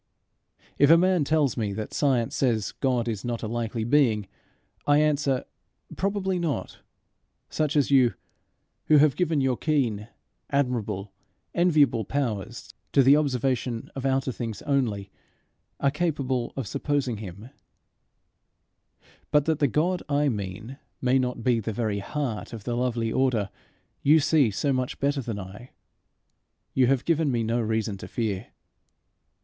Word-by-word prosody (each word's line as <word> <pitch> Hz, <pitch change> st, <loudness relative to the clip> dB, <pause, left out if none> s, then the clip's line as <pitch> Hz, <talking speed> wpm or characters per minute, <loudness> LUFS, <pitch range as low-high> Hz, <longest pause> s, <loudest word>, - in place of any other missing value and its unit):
If 145 Hz, -, +6 dB
a 165 Hz, -, +8 dB
man 180 Hz, -2 st, +3 dB
tells 150 Hz, -3 st, +2 dB
me 105 Hz, -4 st, -2 dB
that 110 Hz, +1 st, -5 dB
science 130 Hz, -6 st, +1 dB
says 115 Hz, -6 st, +1 dB
God 125 Hz, -3 st, 0 dB
is 110 Hz, -4 st, -3 dB
not 120 Hz, -1 st, -3 dB
a -, -, -2 dB
likely 115 Hz, 0 st, -2 dB
being, 115 Hz, -5 st, +2 dB, 0.6 s
I 145 Hz, 0 st, +5 dB
answer, 145 Hz, -3 st, +1 dB, 0.5 s
Probably 190 Hz, -2 st, -1 dB
not 165 Hz, -5 st, -3 dB, 0.7 s
such 155 Hz, 0 st, 0 dB
as 145 Hz, -1 st, +2 dB
you, 130 Hz, -4 st, +4 dB, 0.7 s
who 155 Hz, -, +5 dB
have 145 Hz, -1 st, +5 dB
given 165 Hz, -5 st, +1 dB
your 130 Hz, -2 st, +1 dB
keen, 120 Hz, -9 st, 0 dB, 0.4 s
admirable, 110 Hz, -8 st, -1 dB, 0.4 s
enviable 150 Hz, -9 st, +3 dB
powers 115 Hz, -3 st, -3 dB, 0.2 s
to 140 Hz, -, +6 dB
the 135 Hz, +3 st, +7 dB
observation 130 Hz, -4 st, -1 dB
of 135 Hz, -, -5 dB
outer 135 Hz, -1 st, +1 dB
things 115 Hz, -4 st, -5 dB
only, 115 Hz, -9 st, -1 dB, 0.7 s
are 140 Hz, -, +2 dB
capable 140 Hz, -6 st, -1 dB
of 135 Hz, -, -2 dB
supposing 140 Hz, 0 st, -1 dB
him; 105 Hz, +4 st, -9 dB, 1.8 s
but 150 Hz, -1 st, +3 dB
that 160 Hz, -2 st, 0 dB
the 145 Hz, -, +4 dB
God 170 Hz, +8 st, 0 dB
I 145 Hz, 0 st, +2 dB
mean 110 Hz, +4 st, -5 dB, 0.2 s
may 130 Hz, +1 st, +2 dB
not 125 Hz, -2 st, -2 dB
be 120 Hz, -1 st, +2 dB
the 110 Hz, 0 st, -4 dB
very 105 Hz, -2 st, -1 dB
heart 125 Hz, +1 st, -4 dB
of 110 Hz, -3 st, -7 dB
the 120 Hz, +1 st, -2 dB
lovely 120 Hz, -2 st, -1 dB
order 120 Hz, -7 st, +1 dB, 0.5 s
you 155 Hz, +3 st, +5 dB
see 145 Hz, -4 st, +3 dB
so 135 Hz, +7 st, 0 dB
much 130 Hz, -1 st, -2 dB
better 140 Hz, 0 st, 0 dB
than 115 Hz, -4 st, -4 dB
I, 100 Hz, +6 st, -10 dB, 1.0 s
you 130 Hz, -2 st, +3 dB
have 135 Hz, -1 st, +1 dB
given 160 Hz, -3 st, +2 dB
me 120 Hz, -2 st, 0 dB
no 115 Hz, +2 st, 0 dB
reason 110 Hz, -2 st, -1 dB
to -, -, -9 dB
fear. 110 Hz, -3 st, -3 dB
130 Hz, 145 wpm, -26 LUFS, 115-145 Hz, 1.8 s, a